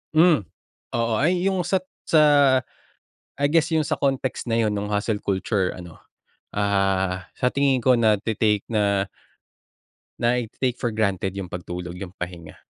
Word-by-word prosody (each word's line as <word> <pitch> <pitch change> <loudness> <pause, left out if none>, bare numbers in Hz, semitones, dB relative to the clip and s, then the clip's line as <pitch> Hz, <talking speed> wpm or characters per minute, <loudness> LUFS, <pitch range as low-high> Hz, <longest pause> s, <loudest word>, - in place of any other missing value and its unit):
Mm. 160 -4 +5 0.6
Oo. 115 -1 0
Ay 175 +4 +2
yung 190 -2 +1
sa 180 +2 +1 0.3
sa 155 -2 +6 1.1
I 145 - +2
guess, 165 -1 +3
yung 160 -2 +1
sa - - -2
context 135 -3 -1
na 115 - +1
yun 110 -2 +2
nung 105 0 -3
hustle 105 0 -1
culture 95 0 0
ano, 85 -2 -11 0.6
ah, 95 -3 0
sa 125 - +1
tingin 135 -3 +1
ko 125 -2 +4
nagte-take 105 -1 +2
na 100 -2 +1 1.1
nai-te-take-for-granted 120 -4 -1
yung 95 - -3
pagtulog- 90 0 -6
yung 95 - -5
pahinga. 85 -3 -7
110 Hz, 130 wpm, -23 LUFS, 95-130 Hz, 1.1 s, sa